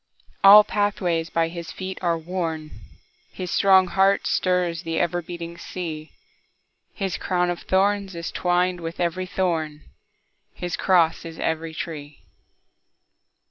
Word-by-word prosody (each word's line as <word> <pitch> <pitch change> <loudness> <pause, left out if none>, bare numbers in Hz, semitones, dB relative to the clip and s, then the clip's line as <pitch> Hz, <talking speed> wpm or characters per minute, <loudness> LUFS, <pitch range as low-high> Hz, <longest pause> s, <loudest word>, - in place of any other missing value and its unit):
All 205 +2 +10
pathways 180 -6 -1
by 165 0 0
his 170 -1 -7
feet 190 0 -6
are 170 -2 +1
worn, 160 -2 -4 0.6
His 180 -1 -6
strong 190 -1 +5
heart 195 +2 +2
stirs 180 -2 0
the 165 -2 -3
ever 175 0 0
beating 170 0 -8
sea, 160 -4 -6 0.9
His 195 -3 -2
crown 180 -1 0
of 175 - -4
thorns 195 0 +1
is 170 0 -5
twined 180 0 0
with 165 0 -6
every 180 +1 -1
thorn, 160 -6 -2 0.7
His 175 -1 -3
cross 170 -4 +2
is 165 -1 -9
every 160 0 -2
tree. 150 -3 -7
175 Hz, 130 wpm, -23 LUFS, 165-185 Hz, 0.9 s, All